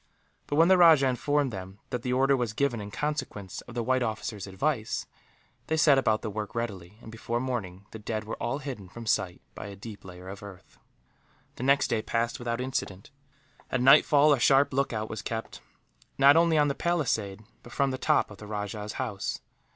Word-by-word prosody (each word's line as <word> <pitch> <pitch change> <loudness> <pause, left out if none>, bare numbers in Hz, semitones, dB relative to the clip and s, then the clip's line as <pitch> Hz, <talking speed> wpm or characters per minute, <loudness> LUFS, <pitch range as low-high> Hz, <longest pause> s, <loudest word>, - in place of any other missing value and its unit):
But 145 - -2
when 165 +2 +6
the 185 0 +5
rajah 160 -5 +7
informed 140 +1 0
them 95 0 -7
that 125 - -2
the 125 - -2
order 135 +2 +3
was 120 -4 -2
given 125 -4 0
in 100 - -7
consequence 105 -7 -4
of 120 - -11
the 120 - -1
white 130 +2 +1
officer's 110 -3 -3
advice, 110 +4 -2 0.6
they 160 - 0
set 145 -3 +5
about 110 -4 +1
the 110 - -3
work 105 +1 -5
readily 105 -5 -5
and, 110 - -10
before 115 +1 -3
morning, 100 -7 -4
the 110 - -8
dead 110 0 -3
were 110 - -5
all 120 +3 -1
hidden 130 -10 -7
from 115 +4 -9
sight 95 -4 -1
by 95 - -8
a 100 - -8
deep 100 +1 -10
layer 90 0 -11
of 100 +1 -8
earth. 100 -3 -13 0.8
The - - -7
next 140 +2 +3
day 110 - +1
passed 115 +1 -1
without 120 -1 -3
incident. 125 -5 -4 0.6
At 130 - 0
nightfall 145 +3 +6
a 135 - +1
sharp 135 +3 +4
lookout 115 -5 -1
was 110 -1 -6
kept, 115 0 -5 0.6
not 140 +2 +7
only 165 -1 +4
on 150 -1 +4
the 140 - 0
palisade 115 - -1 0.2
but 120 - -14
from 140 0 +1
the 130 - -4
top - - +2
of 100 - -12
the 105 - -10
rajah's 105 0 -4
house. 110 -7 -3
115 Hz, 200 wpm, -28 LUFS, 105-135 Hz, 0.8 s, rajah